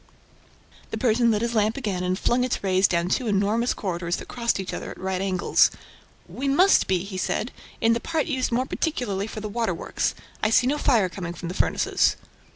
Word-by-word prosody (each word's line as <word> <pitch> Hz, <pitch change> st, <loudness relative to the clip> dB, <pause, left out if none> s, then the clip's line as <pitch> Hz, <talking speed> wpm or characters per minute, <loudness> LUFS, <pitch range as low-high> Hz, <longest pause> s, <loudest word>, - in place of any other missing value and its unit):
The -, -, -4 dB
Persian 235 Hz, -1 st, +3 dB
lit 215 Hz, 0 st, +1 dB
his 235 Hz, 0 st, -1 dB
lamp 215 Hz, +1 st, +1 dB
again 205 Hz, -9 st, -2 dB
and 180 Hz, 0 st, 0 dB
flung 245 Hz, +4 st, +1 dB
its 250 Hz, -, -2 dB
rays 190 Hz, 0 st, +3 dB
down 170 Hz, 0 st, 0 dB
two 240 Hz, +6 st, 0 dB
enormous 210 Hz, +4 st, +1 dB
corridors 175 Hz, -3 st, -2 dB
that -, -, -8 dB
crossed 235 Hz, -4 st, -1 dB
each 190 Hz, -, -4 dB
other -, -, -5 dB
at -, -, -9 dB
right 190 Hz, 0 st, -2 dB
angles. 185 Hz, -2 st, +3 dB, 0.6 s
"We 275 Hz, +3 st, -4 dB
must 360 Hz, +9 st, +4 dB
be," 185 Hz, -2 st, +1 dB
he 190 Hz, -1 st, -6 dB
said, 225 Hz, -, -1 dB, 0.3 s
"in 230 Hz, -1 st, +4 dB
the 230 Hz, -, 0 dB
part 315 Hz, +5 st, -1 dB
used 260 Hz, -5 st, -1 dB
more 250 Hz, +2 st, +1 dB
particularly 235 Hz, -, -2 dB
for 215 Hz, -, -7 dB
the 215 Hz, -, -4 dB
waterworks. 220 Hz, -6 st, -1 dB, 0.3 s
I 215 Hz, -, +2 dB
see 225 Hz, -, +4 dB
no 290 Hz, +3 st, +1 dB
fire 230 Hz, -10 st, +3 dB
coming 175 Hz, -1 st, -6 dB
from 170 Hz, -, -6 dB
the -, -, -4 dB
furnaces." -, -, +2 dB
215 Hz, 205 wpm, -24 LUFS, 185-245 Hz, 0.6 s, must